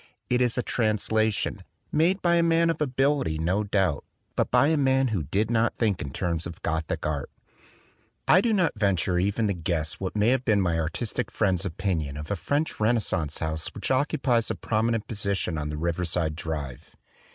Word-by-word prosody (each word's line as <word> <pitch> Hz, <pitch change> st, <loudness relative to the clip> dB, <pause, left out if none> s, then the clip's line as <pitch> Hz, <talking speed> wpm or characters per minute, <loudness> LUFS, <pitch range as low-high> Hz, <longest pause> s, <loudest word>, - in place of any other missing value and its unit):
It 125 Hz, 0 st, +3 dB
is 125 Hz, -1 st, +2 dB
a 125 Hz, -, +1 dB
translation, 110 Hz, -2 st, 0 dB, 0.3 s
made 175 Hz, +6 st, +2 dB
by 170 Hz, -1 st, +4 dB
a -, -, +4 dB
man 165 Hz, 0 st, +3 dB
of 160 Hz, -, -6 dB
ability, 135 Hz, -, +1 dB
no 90 Hz, +6 st, 0 dB
doubt, 95 Hz, -7 st, 0 dB, 0.3 s
but -, -, +1 dB
by 140 Hz, -, +4 dB
a 160 Hz, -, +3 dB
man 135 Hz, -2 st, +2 dB
who 105 Hz, -6 st, -1 dB
did 105 Hz, -, -1 dB
not 115 Hz, 0 st, +1 dB
think 105 Hz, -5 st, +1 dB
in 70 Hz, -, -4 dB
terms 85 Hz, +2 st, -2 dB
of 85 Hz, -, -9 dB
Gothic 80 Hz, -2 st, -2 dB
art. 75 Hz, -2 st, -2 dB, 1.0 s
I 185 Hz, -, +6 dB
do 230 Hz, -, +1 dB
not 185 Hz, -6 st, +2 dB
venture 95 Hz, -3 st, +1 dB
even 100 Hz, +4 st, +1 dB
to 100 Hz, -, +1 dB
guess 80 Hz, -3 st, -2 dB
what 95 Hz, +1 st, -4 dB
may 105 Hz, +2 st, +3 dB
have 130 Hz, 0 st, +2 dB
been 110 Hz, -4 st, +3 dB
my 85 Hz, -3 st, +1 dB
artistic 85 Hz, +8 st, -2 dB
friend's 95 Hz, -4 st, 0 dB
opinion 80 Hz, -6 st, -2 dB
of 75 Hz, +4 st, -6 dB
a -, -, +1 dB
French 145 Hz, +8 st, -1 dB
Renascence 105 Hz, -9 st, 0 dB
house 80 Hz, -1 st, -2 dB
which -, -, -3 dB
occupies 130 Hz, -4 st, +1 dB
a -, -, -1 dB
prominent 115 Hz, -1 st, -1 dB
position 100 Hz, -5 st, -1 dB
on 75 Hz, 0 st, -3 dB
the 75 Hz, -, -4 dB
Riverside 85 Hz, -1 st, -1 dB
Drive. 75 Hz, -6 st, -6 dB
100 Hz, 185 wpm, -26 LUFS, 80-125 Hz, 1.0 s, I